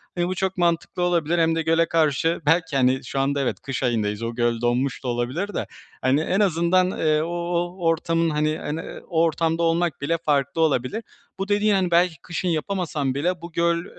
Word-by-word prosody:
Hani, 175 -1 0
bu 185 - -2
çok 190 +1 -2
mantıklı 170 0 0
olabilir 170 -1 +1
hem 165 0 +3
de 165 - 0
göle 165 +1 +2
karşı, 165 +1 +1
belki, 165 -1 +2
hani, 130 0 +2
şu 135 - -3
anda 140 +1 +1
evet, 135 - -2
kış 135 -1 -4
ayındayız, 110 -3 0
o 115 0 -3
göl 120 -1 0
donmuş 125 +3 0
da - - -4
olabilir 125 +12 -2
de, - - -3 0.3
hani, 130 +4 +2
en 185 +5 0
azından, 180 -1 +2
eee, 155 -3 +1
o 165 - -3 0.2
o 175 0 -1
ortamın 165 0 +1
hani 150 0 +1
en, 155 0 -4
eee, 165 - -7
o 165 -1 +1
ortamda 165 0 +1
olmak 165 -3 +1
bile 165 +4 0
farklı 145 -1 0
olabilir. 155 - 0 0.4
Bu 195 - -2
dediğin, 205 +1 +2
hani, 185 -2 0
belki 175 0 +3
kışın 175 +1 -4
yapamasam 160 -4 -1
bile 175 +4 -1
bu 170 0 -8
göl, 170 +1 +1
165 Hz, 200 wpm, -23 LUFS, 140-175 Hz, 0.4 s, hem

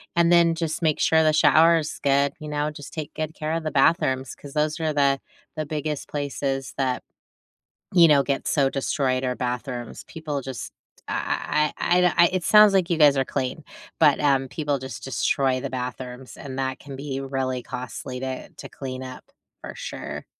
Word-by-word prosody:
and 170 0 +4
then 170 -1 +5
just 160 0 -3
make 155 -3 +1
sure 160 0 +4
the 155 - +3
shower 165 +2 +6
is 155 -1 -4
good, 140 0 +3
you 155 - -8
know? 150 +1 -1
Just 145 -1 -11
take 155 -2 -6
good 155 0 -4
care 155 +1 -3
of 165 - -2
the 155 - -2
bathrooms 135 -3 +2
'cause 140 -1 -12
those 155 +1 0
are 160 -1 0
the 140 -2 +2 0.4
the 155 - -3
biggest 150 -1 -4
places 140 -2 -3
that, 130 -2 0 0.9
you 170 -3 +7
know, 140 -2 +5
get 140 -1 -2
so 140 -3 +2
destroyed, 135 -1 -1
are 125 -1 -1
bathrooms; 125 -1 -4
people 155 -4 -5
just 130 -2 -7 0.3
I 150 0 0
I 175 - +1
I - - +5
I - - +4
the 180 -1 +4
I - - +8
it 185 -2 0
sounds 210 -1 +7
like 185 -3 +2
you 170 - +1
guys 145 -3 +6
are 135 - +3
clean, 135 +4 -3 0.4
but, 150 -3 +5
um, 135 -2 +2
people 145 -2 -2
just 130 +1 -8
destroy 135 -1 +1
the 140 - -4
bathrooms 125 0 -6
and 135 -2 -7
that 130 -1 -2
can 140 -1 -9
be 135 -1 -4
really 130 -2 -2
costly 125 +1 -6
to 130 0 -5
to - - -11
clean 130 -2 -6
up, 130 0 -9 0.4
for - - -8
sure. - - -6
140 Hz, 195 wpm, -24 LUFS, 130-155 Hz, 0.9 s, I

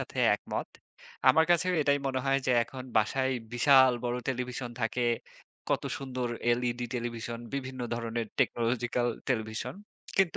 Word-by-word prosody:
সাথে - - -7 0.2
একমত। - - -4 0.6
আমার 160 - +6
কাছেও 175 +1 +3
এটাই 140 0 +3
মনে 130 -1 0
হয় 135 0 +3
যে, - - +3
এখন 130 +2 -7
বাসায় 130 +5 +2 0.2
বিশাল 130 +1 +6
বড় 120 0 0
টেলিভিশন 125 -1 -3
থাকে। 115 +2 0 0.7
কত - - +1 0.2
সুন্দর 130 -2 -3 0.3
LED 120 0 -2
টেলিভিশন, 120 -1 -3 0.2
বিভিন্ন 130 -2 -4
ধরনের 115 -1 -3
টেকনোলজিক্যাল 120 +1 +1 0.2
টেলিভিশন। 110 -3 -2 0.4
কিন্তু 190 -3 +3
125 Hz, 135 wpm, -30 LUFS, 120-135 Hz, 0.7 s, আমার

